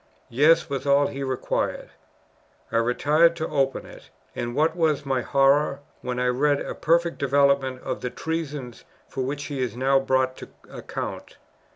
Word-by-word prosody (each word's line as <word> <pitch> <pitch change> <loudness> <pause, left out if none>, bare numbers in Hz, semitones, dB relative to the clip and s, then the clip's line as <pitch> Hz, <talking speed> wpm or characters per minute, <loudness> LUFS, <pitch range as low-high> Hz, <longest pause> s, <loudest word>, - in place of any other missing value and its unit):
Yes! 160 +7 +4
was 140 -1 -4
all 140 +1 +4
he 140 - -5
required. 130 -2 -2 0.8
I - - +1
retired 150 +8 +3
to 160 -1 -3
open 135 -3 0
it; - - -14 0.3
and 120 0 -4
what 160 +2 +2
was 160 -5 +1
my 135 -2 0
horror, 140 +1 +2 0.2
when 125 -1 -4
I 125 - 0
read 140 +3 +2
a - - -5
perfect 170 +1 +1
development 140 -2 +2
of - - -4
the 125 - -2
treasons 145 -6 -5 0.2
for 135 - -5
which 140 +2 -3
he 140 -3 -4
is 120 -1 -3
now 135 +1 +3
brought 130 -1 +1
to - - -10 0.2
account! - - -6
140 Hz, 165 wpm, -24 LUFS, 130-150 Hz, 0.8 s, Yes